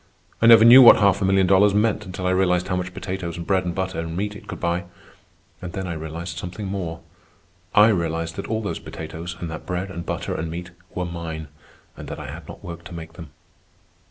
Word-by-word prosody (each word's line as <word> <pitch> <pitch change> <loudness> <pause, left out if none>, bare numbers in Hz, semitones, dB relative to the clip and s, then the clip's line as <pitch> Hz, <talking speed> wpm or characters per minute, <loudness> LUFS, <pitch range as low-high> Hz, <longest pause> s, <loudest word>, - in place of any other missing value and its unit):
I 115 - +5
never 115 -1 +9
knew 125 +3 +10
what 120 - +10
half 100 -1 +3
a - - +2
million 95 0 +3
dollars 100 +2 +4
meant 105 -1 +1
until 90 0 -6
I 90 - +2
realized 90 -1 +1
how 90 - 0
much 90 0 -3
potatoes 90 -2 -5
and 85 - -6
bread 95 -2 +1
and 85 -1 -3
butter 95 -2 -2
and 80 0 -4
meat 105 +1 -2
it 105 - -12
could 90 -5 -7
buy. 85 +1 -1 0.8
And 90 -2 -7
then 95 - -4
I 90 - -3
realized 80 +2 -6
something 90 +4 -6
more. 90 -4 -4 0.7
I 105 +2 +7
realized 85 -4 -1
that - - -5
all 110 0 -2
those 100 - -3
potatoes 80 +2 -7
and 85 - -4
that 80 - -8
bread 90 +1 -3
and 85 -2 -6
butter - - -3
and 80 +1 -3
meat 90 +2 -6 0.2
were 90 - -2
mine, 80 -3 -6 0.5
and - - -9
that - - -6
I - - -7
had - - -10
not - - -11
worked 85 -1 -8
to 85 - -9
make 80 -1 -9
them. 80 -4 -10
90 Hz, 230 wpm, -23 LUFS, 85-100 Hz, 0.8 s, knew